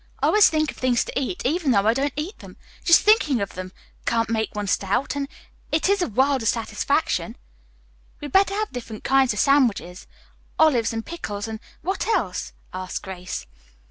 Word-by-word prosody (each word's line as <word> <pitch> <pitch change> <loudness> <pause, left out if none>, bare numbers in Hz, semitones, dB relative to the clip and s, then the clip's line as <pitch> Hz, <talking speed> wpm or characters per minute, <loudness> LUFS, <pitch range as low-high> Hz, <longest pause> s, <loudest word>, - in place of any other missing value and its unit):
I - - +1
always 420 -1 +6
think 310 -1 0
of - - -17
things 250 -2 +1
to - - -7
eat, 275 +4 -2
even 310 +2 +1
though 200 -5 +3
I 220 - +4
don't 275 +3 0
eat 310 +8 -5
them. - - -13 0.3
Just 335 - +6
thinking 360 - +4
of 200 -1 -3
them 185 0 -7 0.4
can't 230 -1 +1
make 220 -1 -1
one 210 0 -2
stout, 200 +8 0
and 280 -1 -2 0.4
it 315 +4 +2
is 400 -1 +2
a - - +1
world 265 +4 +2
of 225 - -2
satisfaction." 230 +1 0 0.8
"We - - -7
had 290 - -7
better 390 +3 +4
have 430 +1 -2
different 230 -4 -7
kinds 265 -1 +3
of 210 - -4
sandwiches, 230 -9 +2 0.5
olives 255 -8 +4
and 225 -1 -4
pickles, 210 -11 -5
and 220 -1 -6 0.2
what 380 +4 -2
else?" 235 - -1 0.2
asked 185 0 -5
Grace. 180 - -6
255 Hz, 190 wpm, -23 LUFS, 210-310 Hz, 0.8 s, always